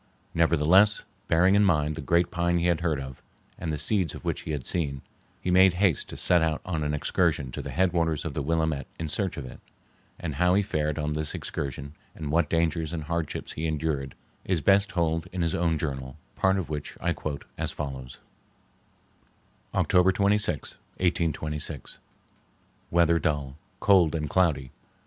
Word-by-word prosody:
Nevertheless, 85 Hz, +5 st, +4 dB, 0.2 s
bearing 90 Hz, +3 st, +4 dB
in 100 Hz, +1 st, +5 dB
mind 75 Hz, -5 st, +2 dB
the 80 Hz, -, -6 dB
great 85 Hz, +4 st, +2 dB
pine 85 Hz, 0 st, +1 dB
he 85 Hz, -, 0 dB
had 85 Hz, -2 st, +2 dB
heard 80 Hz, -4 st, 0 dB
of, 65 Hz, -1 st, -8 dB, 0.4 s
and 80 Hz, -2 st, -3 dB
the 75 Hz, -, -2 dB
seeds 90 Hz, -1 st, 0 dB
of -, -, -10 dB
which -, -, -1 dB
he -, -, -5 dB
had 70 Hz, -4 st, -3 dB
seen, 70 Hz, -6 st, -1 dB, 0.4 s
he 90 Hz, -, -2 dB
made 95 Hz, 0 st, +6 dB
haste 90 Hz, -4 st, +1 dB
to -, -, -7 dB
set 90 Hz, -1 st, +4 dB
out 80 Hz, -1 st, +1 dB
on 80 Hz, -4 st, -2 dB
an 75 Hz, 0 st, 0 dB
excursion 70 Hz, -2 st, 0 dB
to -, -, -5 dB
the -, -, -6 dB
headwaters 85 Hz, -4 st, +1 dB
of 80 Hz, -, -3 dB
the 75 Hz, -, -2 dB
Willamette 80 Hz, -2 st, 0 dB
in 80 Hz, -, -3 dB
search 95 Hz, +4 st, -2 dB
of 70 Hz, -, -5 dB
it; 65 Hz, -, -10 dB, 0.6 s
and -, -, -4 dB
how 90 Hz, +1 st, +3 dB
he 100 Hz, -, +3 dB
fared 75 Hz, -4 st, -1 dB
on 75 Hz, -1 st, -1 dB
this 75 Hz, 0 st, -2 dB
excursion 70 Hz, +1 st, -5 dB, 0.2 s
and 75 Hz, -2 st, -5 dB
what 80 Hz, -1 st, +2 dB
dangers 80 Hz, -1 st, 0 dB
and 80 Hz, -2 st, -3 dB
hardships 85 Hz, 0 st, -3 dB
he 80 Hz, +1 st, -3 dB
endured 75 Hz, -4 st, -2 dB, 0.3 s
is 90 Hz, -3 st, 0 dB
best 100 Hz, +3 st, +4 dB
told 80 Hz, -3 st, 0 dB
in 90 Hz, -1 st, -2 dB
his 85 Hz, -, 0 dB
own 85 Hz, -2 st, +1 dB
journal, 65 Hz, -4 st, -4 dB, 0.2 s
part 95 Hz, 0 st, +2 dB
of 90 Hz, -6 st, -2 dB
which 75 Hz, -1 st, -5 dB
I 85 Hz, 0 st, 0 dB
quote 75 Hz, -2 st, -5 dB
as -, -, -2 dB
follows:— 65 Hz, -3 st, -6 dB, 1.6 s
October 90 Hz, +1 st, +4 dB
26th, 100 Hz, -4 st, 0 dB, 0.2 s
1826. 80 Hz, -5 st, -2 dB, 0.9 s
Weather 85 Hz, -1 st, +3 dB
dull. 70 Hz, -4 st, -1 dB, 0.2 s
Cold 90 Hz, -6 st, +4 dB
and 75 Hz, -2 st, -2 dB
cloudy. 75 Hz, -6 st, +1 dB
80 Hz, 175 wpm, -27 LUFS, 75-90 Hz, 1.6 s, made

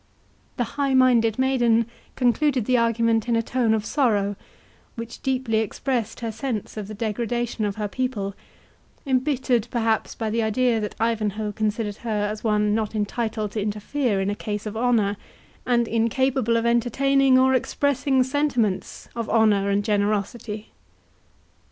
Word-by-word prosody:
The 245 Hz, -, +1 dB, 0.2 s
high 275 Hz, -1 st, +2 dB
minded 240 Hz, -4 st, +4 dB
maiden 240 Hz, -3 st, +3 dB, 0.3 s
concluded 255 Hz, 0 st, +2 dB
the 255 Hz, -, +2 dB
argument 230 Hz, -1 st, +2 dB
in 235 Hz, -, +3 dB
a 230 Hz, -, +1 dB
tone 245 Hz, -1 st, +1 dB
of 215 Hz, -1 st, -3 dB
sorrow, 210 Hz, -8 st, +1 dB, 0.6 s
which 230 Hz, -1 st, -7 dB
deeply 255 Hz, -4 st, 0 dB
expressed 225 Hz, +1 st, -2 dB
her 230 Hz, -1 st, -2 dB
sense 225 Hz, -2 st, -4 dB
of 210 Hz, -2 st, -5 dB
the 215 Hz, -, -7 dB
degradation 230 Hz, +1 st, -2 dB
of 200 Hz, -1 st, -2 dB
her 210 Hz, -1 st, -2 dB
people, 210 Hz, -4 st, -2 dB, 0.7 s
embittered 260 Hz, -3 st, +1 dB
perhaps 225 Hz, -3 st, 0 dB
by 220 Hz, -2 st, -3 dB
the 230 Hz, +1 st, +1 dB
idea 230 Hz, +2 st, +1 dB
that 210 Hz, -1 st, -4 dB
Ivanhoe 215 Hz, -2 st, -1 dB
considered 210 Hz, 0 st, -2 dB
her 210 Hz, -3 st, -1 dB
as 215 Hz, 0 st, -6 dB
one 210 Hz, -2 st, +2 dB
not 220 Hz, 0 st, -1 dB
entitled 215 Hz, 0 st, -2 dB
to 215 Hz, -, -2 dB
interfere 210 Hz, +2 st, -1 dB
in 195 Hz, +1 st, 0 dB
a -, -, -2 dB
case 210 Hz, 0 st, -4 dB
of 215 Hz, 0 st, -5 dB
honour, 220 Hz, -4 st, +1 dB, 0.5 s
and 240 Hz, -2 st, +2 dB
incapable 230 Hz, +1 st, +1 dB
of 230 Hz, -, -1 dB
entertaining 260 Hz, +3 st, +3 dB
or 260 Hz, 0 st, +4 dB
expressing 265 Hz, 0 st, +1 dB
sentiments 255 Hz, -7 st, -1 dB
of 230 Hz, -1 st, -3 dB
honour 210 Hz, -3 st, +3 dB
and 200 Hz, 0 st, +1 dB
generosity. 210 Hz, +1 st, -1 dB
230 Hz, 150 wpm, -24 LUFS, 210-250 Hz, 0.7 s, minded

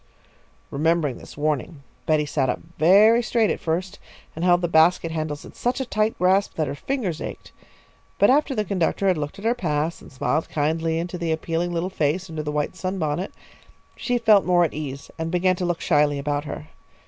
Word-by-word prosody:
Remembering 155 Hz, -2 st, +1 dB
this -, -, -13 dB
warning, 150 Hz, 0 st, -2 dB, 0.2 s
Betty 155 Hz, -1 st, +2 dB
sat 140 Hz, -2 st, 0 dB
up -, -, -1 dB, 0.2 s
very 210 Hz, +8 st, +6 dB
straight 230 Hz, -2 st, +1 dB
at -, -, -3 dB
first, 175 Hz, +3 st, -3 dB, 0.4 s
and 160 Hz, -, -4 dB
held 175 Hz, 0 st, +4 dB
the 175 Hz, -, +1 dB
basket 165 Hz, +1 st, +3 dB
handles 155 Hz, -2 st, -4 dB
in -, -, -12 dB
such 245 Hz, +2 st, -1 dB
a 265 Hz, -, -2 dB
tight 215 Hz, -1 st, 0 dB
grasp 190 Hz, +2 st, +2 dB
that 155 Hz, -, 0 dB
her 140 Hz, -, -4 dB
fingers 185 Hz, -, -3 dB
ached. -, -, -7 dB, 0.7 s
But -, -, +5 dB
after 285 Hz, 0 st, +2 dB
the 215 Hz, -2 st, 0 dB
conductor 195 Hz, +1 st, 0 dB
had 185 Hz, -3 st, +3 dB
looked 145 Hz, 0 st, -5 dB
at 200 Hz, -, -9 dB
her 230 Hz, -, +3 dB
pass 160 Hz, -6 st, -2 dB
and -, -, -14 dB
smiled 155 Hz, +4 st, -1 dB
kindly 160 Hz, +2 st, 0 dB
into 175 Hz, +1 st, -4 dB
the 170 Hz, -1 st, -1 dB
appealing 165 Hz, +2 st, -1 dB
little 175 Hz, +2 st, -2 dB
face 165 Hz, +3 st, -1 dB
under 155 Hz, -1 st, -3 dB
the 150 Hz, 0 st, -3 dB
white 150 Hz, +3 st, -2 dB
sunbonnet, 185 Hz, -2 st, -2 dB, 0.6 s
she 245 Hz, -1 st, -1 dB
felt 220 Hz, -4 st, +5 dB
more 175 Hz, -1 st, +3 dB
at 165 Hz, -, -1 dB
ease 140 Hz, -2 st, -6 dB
and 160 Hz, 0 st, -2 dB
began 180 Hz, +1 st, +2 dB
to 180 Hz, -, -2 dB
look 175 Hz, -1 st, -1 dB
shyly 145 Hz, -2 st, +2 dB
about 145 Hz, +1 st, -2 dB
her. 155 Hz, +1 st, -7 dB
165 Hz, 200 wpm, -23 LUFS, 150-190 Hz, 0.7 s, very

